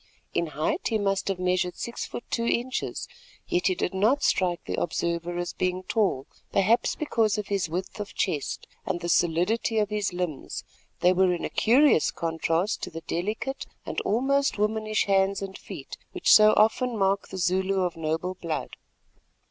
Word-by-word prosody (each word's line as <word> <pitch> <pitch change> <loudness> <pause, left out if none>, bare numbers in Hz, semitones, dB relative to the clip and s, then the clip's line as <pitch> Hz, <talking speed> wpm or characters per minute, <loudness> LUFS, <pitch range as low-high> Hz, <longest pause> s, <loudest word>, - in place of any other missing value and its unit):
In 170 - 0
height 155 - -1
he 225 - +1
must 195 -2 0
have 195 -2 0
measured 180 0 0
six 235 - -4
foot 240 - -6
two 230 0 0
inches, 250 +2 -1 0.4
yet 175 - +1
he 185 - +2
did 180 - -2
not 220 +9 +2
strike 180 -2 +1
the - - -2
observer 170 +1 -2
as 175 0 -3
being 185 0 -1
tall, 190 - 0 0.3
perhaps 220 +5 +3
because 225 -8 +1
of 210 -1 -4
his 195 -4 0
width 180 +5 -4
of 205 - -6
chest 155 -8 -2 0.2
and 175 - -2
the 170 - -3
solidity 175 +7 +2
of 210 -1 +1
his 210 -2 0
limbs, 175 -5 -4 0.4
that 180 +1 +5
were 185 0 +4
in 175 - -2
curious 255 - +4
contrast 165 +3 -1
to - - -4
the 165 0 -7
delicate 215 +11 -3 0.2
and - - -2
almost 275 +5 +1
womanish 215 +1 +1
hands 195 0 +2
and 195 -1 -6
feet - - -9
which - - +4
so 215 0 +8
often 225 +3 +3
mark 195 0 +1
the 190 - -7
Zulu 190 +2 +1
of 180 -2 -1
noble 165 +3 -2
blood. 165 -4 -4
190 Hz, 170 wpm, -26 LUFS, 175-215 Hz, 0.4 s, so